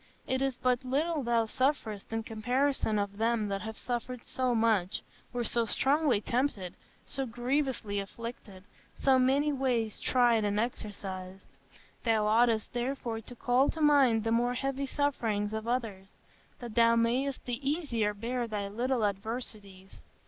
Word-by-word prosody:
It 260 Hz, 0 st, -1 dB
is 270 Hz, -2 st, 0 dB
but 250 Hz, 0 st, +1 dB
little 295 Hz, +5 st, 0 dB
thou 235 Hz, -2 st, +2 dB
sufferest 220 Hz, -5 st, -1 dB
in 225 Hz, 0 st, -2 dB
comparison 245 Hz, +1 st, 0 dB
of 200 Hz, 0 st, -2 dB
them 225 Hz, -1 st, +1 dB
that 195 Hz, 0 st, -2 dB
have 220 Hz, 0 st, -6 dB
suffered 245 Hz, 0 st, -4 dB
so 255 Hz, -2 st, 0 dB
much, 220 Hz, -5 st, +1 dB, 0.3 s
were 245 Hz, -1 st, -2 dB
so 235 Hz, 0 st, 0 dB
strongly 280 Hz, -1 st, +2 dB
tempted, 230 Hz, -7 st, -1 dB, 0.3 s
so 270 Hz, -2 st, -2 dB
grievously 245 Hz, -3 st, -1 dB
afflicted, 200 Hz, -2 st, -8 dB, 0.3 s
so 265 Hz, -1 st, +3 dB
many 280 Hz, +4 st, +3 dB
ways 245 Hz, -5 st, 0 dB
tried 240 Hz, -3 st, +3 dB
and 205 Hz, 0 st, +1 dB
exercised. 195 Hz, -5 st, -5 dB, 0.6 s
Thou 220 Hz, -3 st, +2 dB
oughtest 225 Hz, 0 st, +3 dB
therefore 240 Hz, -2 st, -2 dB
to 245 Hz, +3 st, -12 dB
call 250 Hz, +3 st, +2 dB
to 320 Hz, -, -4 dB
mind 275 Hz, -7 st, +5 dB
the 225 Hz, -, 0 dB
more 240 Hz, +2 st, +2 dB
heavy 275 Hz, +1 st, -2 dB
sufferings 225 Hz, -8 st, 0 dB
of 220 Hz, +1 st, -4 dB
others, 220 Hz, -6 st, -3 dB, 0.4 s
that 240 Hz, -3 st, -8 dB
thou 230 Hz, 0 st, +5 dB
mayest 250 Hz, +4 st, 0 dB
the 250 Hz, +3 st, -2 dB
easier 235 Hz, -10 st, 0 dB
bear 240 Hz, +3 st, -2 dB
thy 205 Hz, -2 st, -3 dB
little 240 Hz, +2 st, 0 dB
adversities. 200 Hz, -2 st, -5 dB
235 Hz, 150 wpm, -30 LUFS, 215-260 Hz, 0.6 s, mind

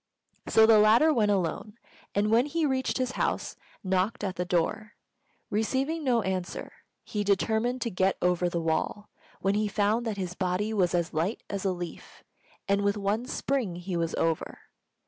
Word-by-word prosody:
So 220 Hz, -, +6 dB
the 220 Hz, -1 st, +6 dB
latter 230 Hz, +9 st, +5 dB
went 215 Hz, -6 st, +2 dB
alone, 205 Hz, +3 st, -1 dB, 0.4 s
and 205 Hz, +1 st, +2 dB
when 235 Hz, +5 st, +4 dB
he 320 Hz, +2 st, 0 dB
reached 260 Hz, -2 st, 0 dB
his 255 Hz, -1 st, -1 dB
house, -, -, -2 dB, 0.3 s
knocked 190 Hz, +5 st, 0 dB
at 190 Hz, -2 st, -2 dB
the 180 Hz, -, -2 dB
door. 200 Hz, +5 st, -1 dB, 0.6 s
Receiving 265 Hz, +9 st, 0 dB
no 240 Hz, -5 st, +2 dB
answer, 185 Hz, -1 st, -3 dB, 0.3 s
he 210 Hz, -1 st, -3 dB
determined 220 Hz, +5 st, +1 dB
to 235 Hz, -, -3 dB
get 190 Hz, +1 st, +1 dB
over 180 Hz, 0 st, +1 dB
the 170 Hz, -, -2 dB
wall, 165 Hz, +6 st, -2 dB, 0.3 s
when 195 Hz, -, +2 dB
he 210 Hz, +1 st, +1 dB
found 210 Hz, +3 st, +1 dB
that 215 Hz, -2 st, -2 dB
his 180 Hz, -2 st, -3 dB
body 185 Hz, +4 st, -1 dB
was 180 Hz, -4 st, +2 dB
as 170 Hz, 0 st, -1 dB
light 165 Hz, +8 st, -1 dB
as 200 Hz, -1 st, -3 dB
a 190 Hz, -, +2 dB
leaf, 175 Hz, -2 st, -8 dB, 0.4 s
and 200 Hz, 0 st, +2 dB
with 200 Hz, +1 st, +1 dB
one 205 Hz, +4 st, -1 dB
spring 255 Hz, -10 st, -1 dB
he 180 Hz, +1 st, -5 dB
was 165 Hz, -1 st, -1 dB
over. 165 Hz, -1 st, -1 dB
205 Hz, 175 wpm, -28 LUFS, 180-225 Hz, 0.6 s, So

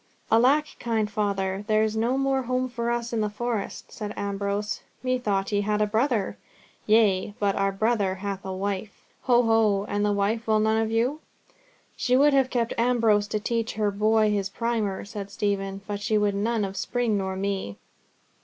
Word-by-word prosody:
"Alack, 260 Hz, +7 st, +5 dB
kind 220 Hz, -3 st, -1 dB
father, 195 Hz, -2 st, -1 dB
there's 215 Hz, 0 st, +2 dB
no 235 Hz, +4 st, +1 dB
more 270 Hz, 0 st, +1 dB
home 255 Hz, +1 st, -1 dB
for 235 Hz, -1 st, -3 dB
us 235 Hz, 0 st, -2 dB
in 225 Hz, -, +1 dB
the 210 Hz, -, 0 dB
Forest," 220 Hz, -1 st, -4 dB
said 210 Hz, -1 st, -6 dB
Ambrose. 200 Hz, +1 st, -2 dB, 0.2 s
"Methought 220 Hz, -7 st, 0 dB
ye 205 Hz, -1 st, +2 dB
had 210 Hz, +1 st, 0 dB
a 210 Hz, -, +3 dB
brother?" 220 Hz, -1 st, 0 dB, 0.5 s
"Yea; 210 Hz, -2 st, +3 dB
but 200 Hz, -1 st, +1 dB
our 195 Hz, 0 st, +1 dB
brother 205 Hz, -1 st, +1 dB
hath 195 Hz, 0 st, -5 dB
a 190 Hz, -, -5 dB
wife." 195 Hz, +2 st, -3 dB, 0.4 s
"Ho! 245 Hz, -1 st, +5 dB
ho! 220 Hz, -3 st, +3 dB
And 205 Hz, 0 st, -1 dB
the 210 Hz, -, +2 dB
wife 205 Hz, +3 st, 0 dB
will 215 Hz, -1 st, +3 dB
none 220 Hz, +1 st, +2 dB
of 220 Hz, -, -1 dB
you?" 240 Hz, +7 st, 0 dB, 0.8 s
"She 250 Hz, +1 st, +2 dB
would 290 Hz, +1 st, +5 dB
have 265 Hz, -2 st, +3 dB
kept 235 Hz, -2 st, 0 dB
Ambrose 230 Hz, -4 st, +3 dB
to 215 Hz, 0 st, -2 dB
teach 230 Hz, +1 st, -2 dB
her 210 Hz, -1 st, 0 dB
boy 215 Hz, +1 st, +3 dB
his 200 Hz, -2 st, -1 dB
primer," 220 Hz, -4 st, -2 dB
said 200 Hz, -1 st, -7 dB
Stephen; 200 Hz, -1 st, -2 dB
"but 205 Hz, -1 st, -4 dB
she 215 Hz, +1 st, +1 dB
would 205 Hz, -1 st, +2 dB
none 215 Hz, +1 st, 0 dB
of 195 Hz, 0 st, -6 dB
Spring 240 Hz, -3 st, 0 dB
nor 190 Hz, -1 st, -1 dB
of 190 Hz, -, -5 dB
me." 195 Hz, -, -3 dB
215 Hz, 185 wpm, -26 LUFS, 200-235 Hz, 0.8 s, Alack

